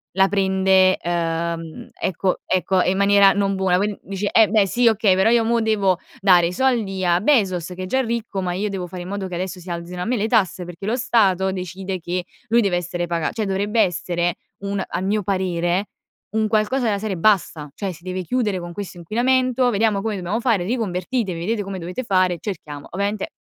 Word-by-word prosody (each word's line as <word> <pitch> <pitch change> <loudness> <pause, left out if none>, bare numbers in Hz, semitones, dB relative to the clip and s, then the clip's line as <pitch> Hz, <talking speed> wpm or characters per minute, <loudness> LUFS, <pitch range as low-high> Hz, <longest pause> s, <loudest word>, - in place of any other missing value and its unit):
la 195 0 +5
prende, 190 -1 +3
uhm, 165 -1 -3
ecco 185 +1 -1
ecco 185 0 +1
e - - +2
in 190 - 0
maniera 200 0 +6
non 195 -1 0
buona, 190 -2 +2
quin 205 +2 -1
dici: 195 +1 -3
eh 220 -4 +5
beh, 210 -2 +3
sì 240 +4 +3
okay, 210 -3 +3
però 190 +4 +3
io 230 -1 +3
mo 235 0 +2
devo 200 -5 +1 0.2
dare 180 -3 +5
i - - -3
soldi 205 -4 0
a 175 +1 +3
Bezos 195 - +2
che 185 0 -7
è - - -3
già 260 +8 +1
ricco, 230 -5 -3
ma 180 -1 -2
io 195 +4 -2
devo 190 -3 -4
fare 180 0 -7
in 180 - -9
modo 200 -1 -4
che 180 - -5
adesso 185 0 -4
si 180 - -11
alzino 175 +1 -5
a - - -2
me 245 +4 0
le 215 +1 0
tasse, 195 -6 +1
perché 175 +2 -9
lo 235 +4 0
Stato 190 -6 +2
decide 185 +1 -5
che 175 +1 -3 0.2
lui 235 +1 +4
deve 200 -5 +2
essere 175 0 -3
paga 170 -2 -1
cioè 220 -2 -2
dovrebbe 200 +3 -1
essere 175 -1 0 0.3
un 200 -1 -2
a - - -4
mio 200 +2 0
parere, 185 0 0 0.5
un 220 -1 +1
qualcosa 225 +4 +1
della 205 -2 +1
serie: 210 -2 -3
basta; 165 -6 +1
cioè 195 -3 -4
si 170 +1 -16
deve 185 0 -4
chiudere 210 -3 -1
con 175 0 -7
questo 195 -2 -7
inquinamento. 250 +6 +1
Vediamo 210 -2 +1
come 215 -1 -2
dobbiamo 190 +5 -2
fare, 225 -8 +1
riconvertitevi, 195 -2 -2
vedete 210 +5 -1
come 195 -1 -6
dovete 180 +9 -5
fare, 185 -5 +2
cerchiamo 150 -8 -6
ovviamente, 200 +2 -2
190 Hz, 210 wpm, -21 LUFS, 180-215 Hz, 0.5 s, maniera